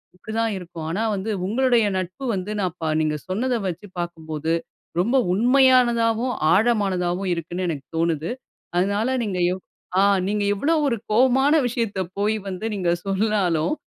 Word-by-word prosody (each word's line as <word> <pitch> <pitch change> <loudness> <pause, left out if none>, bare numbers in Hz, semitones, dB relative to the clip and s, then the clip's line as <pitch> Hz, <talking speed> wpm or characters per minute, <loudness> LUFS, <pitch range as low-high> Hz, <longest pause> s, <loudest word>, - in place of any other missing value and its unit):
இப்டி 215 +4 -10
தான் 225 -1 +1
இருக்கும். 170 -3 -8
ஆனா 200 +7 -1
வந்து, 195 +3 -4 0.2
உங்களுடைய 240 +2 +3
நட்பு 185 +9 -4
வந்து, 190 +2 -4
நான் 180 -2 -2
பா 160 - 0
நீங்க 155 -1 0
சொன்னதை 240 +6 0
வச்சி 180 +3 -5
பாக்கும்போது, 160 -2 -3 0.5
ரொம்ப 235 +9 +2 0.2
உண்மையானதாவும், 245 0 +4 0.2
ஆழமானதாவும் 195 -4 +1
இருக்குன்னு 175 +2 -4
எனக்கு 140 -5 -4
தோணுது. 165 -1 0 0.5
அதனால 205 +7 +1
நீங்க 190 -4 -2
எவ் 185 - -7 0.4
அ - - +5 0.3
நீங்க 205 0 0
எவ்வளவு 305 +8 +1
ஒரு 235 - 0
கோவமான 265 +5 +4
விஷயத்த 230 -5 -2 0.2
போய் 215 +2 +1
வந்து 185 +4 -5
நீங்க 180 -3 0
சொன்னாலும், 195 - +1
200 Hz, 145 wpm, -23 LUFS, 175-235 Hz, 0.5 s, அ